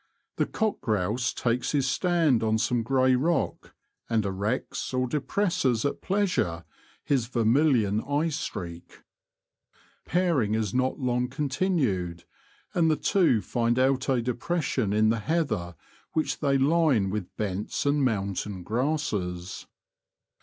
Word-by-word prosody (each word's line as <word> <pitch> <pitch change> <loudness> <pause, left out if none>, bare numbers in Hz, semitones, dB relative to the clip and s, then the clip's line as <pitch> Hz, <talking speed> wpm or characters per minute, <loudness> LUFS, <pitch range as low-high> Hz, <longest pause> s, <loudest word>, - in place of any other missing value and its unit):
The - - +1
cock 220 -2 -1
grouse 110 +4 0
takes 125 +3 -1
his 140 -3 +2
stand 165 -5 +2
on 110 0 +2
some 120 +2 +1
grey 130 +2 +3
rock, 160 +7 -1 0.3
and 110 -3 +1
erects 100 +7 -2
or 130 0 +1
depresses 145 - 0
at 140 - -2
pleasure 180 - 0 0.4
his 130 -5 +1
ver 120 -2 -1
milion 115 -5 +3
eye 150 +3 +1
streak. 90 - -6 1.0
Pairing 165 - +1
is 110 -3 -1
not 130 +1 +1
long 125 -1 0
con 140 +3 -3
tinued, 120 - 0 0.5
and 165 -2 +3
the 155 - +3
two 165 - +2
find 120 0 0
out 130 +1 +2
a 125 -3 +2
depression 125 - -1
in 110 +1 +3
the 115 0 +1
heather 110 - -1 0.4
which 155 - -1
thev 140 -2 +2
line 145 - +3
with 105 -3 -5
bents 105 +5 -2
and 145 0 +2
mountain 100 -4 -2
grasses. 105 - -2
125 Hz, 130 wpm, -27 LUFS, 105-150 Hz, 1.0 s, grey